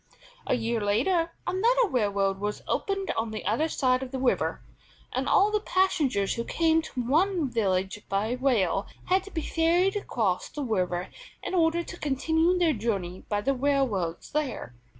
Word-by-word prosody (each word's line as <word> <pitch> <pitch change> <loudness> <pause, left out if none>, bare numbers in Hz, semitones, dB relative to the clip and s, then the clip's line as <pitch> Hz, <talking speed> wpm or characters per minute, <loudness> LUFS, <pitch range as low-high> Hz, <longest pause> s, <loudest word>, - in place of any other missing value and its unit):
A - - +2
year 230 -1 -1
later 330 - +1
another 465 +6 +2
railroad 200 - 0
was 210 +1 -3
opened 390 -1 -1
on 225 0 -2
the 215 0 -6
other 235 +11 +1
side 255 -4 +1
of 265 - -5
the 265 - -4
river, 260 -1 0 0.5
and - - -1
all 405 +2 +4
the 425 - +2
passengers 310 - +1
who 235 - -3
came 325 +4 +2
to 265 -5 -5
one 325 +5 +2
village 195 -2 0
by 200 +3 0
rail 240 -7 +1 0.2
had 375 +1 +3
to 400 - -11
be 320 -3 -3
ferried 345 +4 +2
across 220 - -1
the 295 - -5
river 180 -6 -1 0.3
in - - -4
order 340 -1 +2
to 350 - -9
continue 320 +5 +1
their 340 -3 +3
journey 200 -6 -3
by 205 -1 0
the 275 +6 +1
railroads 255 -11 -1
there. 290 - -3
265 Hz, 170 wpm, -27 LUFS, 205-335 Hz, 0.5 s, all